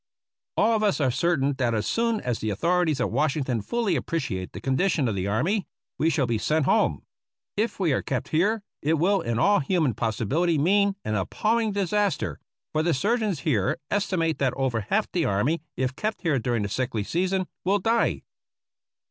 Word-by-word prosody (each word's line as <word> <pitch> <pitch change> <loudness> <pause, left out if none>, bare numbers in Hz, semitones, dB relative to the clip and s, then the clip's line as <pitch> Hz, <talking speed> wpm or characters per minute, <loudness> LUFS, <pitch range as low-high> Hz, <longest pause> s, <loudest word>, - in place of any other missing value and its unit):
All 225 +2 +4
of 215 - 0
us 205 -5 +2
are 135 -4 +2
certain 145 -1 +1
that 120 -3 +1
as 105 - -1
soon 230 -2 0
as 120 -2 -2
the 110 - -2
authorities 160 - +1
at - - 0
Washington 135 -6 0
fully 225 - 0
appreciate 120 - -3
the - - -7
condition 135 +2 +1
of 110 - 0
the 95 0 -2
army, 175 - 0 0.3
we 160 - +3
shall 140 -4 +1
be 115 -3 -1
sent 155 +3 +1
home. - - +2 0.5
If 215 +1 -1
we 170 -7 +2
are - - +1
kept 130 - -3
here 200 +7 +1 0.2
it 155 +3 +2
will 190 +5 +2
in 115 -1 -2
all 205 - +4
human 150 -3 +1
possibiHty 120 - 0
mean 200 +5 +3
an 110 - -1
appalling 215 - 0
disaster, 200 -3 0 0.3
for 155 - +2
the 165 -1 +1
sur 210 - +1
geons 205 -8 -1
here 110 - +1
estimate 180 -6 0
that 135 -2 +1
over 130 -4 0
half 215 +1 +2
the 170 -3 0
army, 125 +12 +1 0.2
if 130 0 -1
kept 215 +7 -3
here 155 -6 +2
during 115 -1 -1
the 100 - -3
sickly 120 -1 -2
season, 185 - 0 0.2
will 195 +3 +2
die. 225 +4 +1
160 Hz, 190 wpm, -25 LUFS, 125-195 Hz, 0.5 s, All